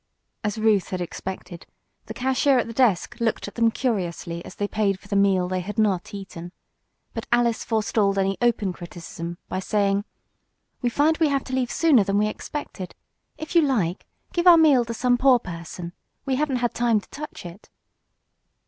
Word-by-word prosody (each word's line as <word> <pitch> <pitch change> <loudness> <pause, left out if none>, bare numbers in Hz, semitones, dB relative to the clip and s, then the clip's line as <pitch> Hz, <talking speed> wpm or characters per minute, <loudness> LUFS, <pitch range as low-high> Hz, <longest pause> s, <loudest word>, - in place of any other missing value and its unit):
As 210 0 -2
Ruth 215 -3 +2
had 185 - -3
expected, 180 0 -6 0.4
the - - -7
cashier 265 +1 +2
at 245 - +1
the 230 - -7
desk 230 -7 +2
looked 230 -3 -1
at 205 - -8
them 230 -1 +3
curiously 180 -8 -2
as - - -11
they 205 - -1
paid 205 -3 0
for 200 - -17
the 205 - -2
meal 195 -2 +3
they 185 0 -1
had 210 +5 -6
not 200 -5 +1
eaten. 185 -4 -8 0.6
But 225 - -5
Alice 240 -1 +2
forestalled 215 -3 +1
any 195 0 +1
open 220 -6 +1
criticism 170 0 -8
by 185 - -3
saying: 200 +1 +1 0.8
"We 245 - +1
find 305 +6 +2
we 320 -2 +3
have 275 -1 0
to 260 - -8
leave 255 -2 0
sooner 295 -10 +4
than 195 +1 0
we 210 - +3
expected. 215 -3 -6 0.4
If 315 - -7
you 340 - +6
like, 215 - 0 0.3
give 345 +1 +1
our 345 -1 +10
meal 290 -7 +5
to 230 - -4
some 245 +1 +2
poor 265 -1 +6
person. 170 -3 -7 0.3
We 270 -2 0
haven't 285 -1 0
had 240 - -1
time 235 -2 +2
to - - -17
touch 300 -9 -8
it." 175 +4 -11
215 Hz, 185 wpm, -24 LUFS, 190-250 Hz, 0.8 s, our